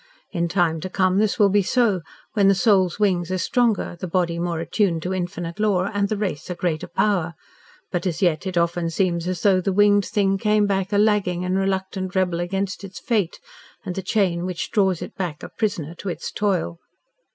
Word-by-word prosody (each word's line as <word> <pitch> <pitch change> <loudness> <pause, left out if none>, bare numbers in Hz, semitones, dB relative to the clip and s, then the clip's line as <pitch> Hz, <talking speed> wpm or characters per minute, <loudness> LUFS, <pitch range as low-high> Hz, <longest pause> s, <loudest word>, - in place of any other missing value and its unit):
In 170 -2 0
time 170 -3 +1
to 185 - -4
come 185 +1 +2
this 215 -1 +1
will 205 -2 +5
be 205 +1 +4
so, 210 -2 +2 0.3
when 200 -3 +3
the 195 - +5
soul's 190 -3 +3
wings 185 -4 +1
are 185 - 0
stronger, 235 -3 +1
the 185 - -4
body 170 -1 0
more 170 -1 -2
attuned 165 0 0
to 185 - -2
infinite 175 0 -4
law 200 -2 +1
and 200 0 0
the 215 - -1
race 185 -7 -3
a 180 - -3
greater 170 -3 -2
power 175 -3 0 0.6
but 180 +1 -1
as 165 -3 -2
yet 175 -1 +1
it 185 -2 -3
often 170 0 +1
seems 170 -1 0
as 185 -1 -3
though 190 -2 +4
the 195 - 0
winged 205 0 +4
thing 195 -3 +1
came 210 0 +3
back 195 -1 -1
a 205 - +2
lagging 200 -4 +2
and 180 +1 0
reluctant 190 0 -2
rebel 180 -2 +1
against 190 +2 -2
its 190 -3 -8
fate 205 -7 -1 0.5
and 185 - -3
the 195 - -3
chain 185 -3 +1
which 180 -2 -4
draws 190 -5 +2
it - - -8
back 175 -6 -4
a - - -6
prisoner 175 -8 -2
to 190 +3 -6
its 175 - -5
toil. 185 - -1
185 Hz, 210 wpm, -23 LUFS, 175-200 Hz, 0.6 s, will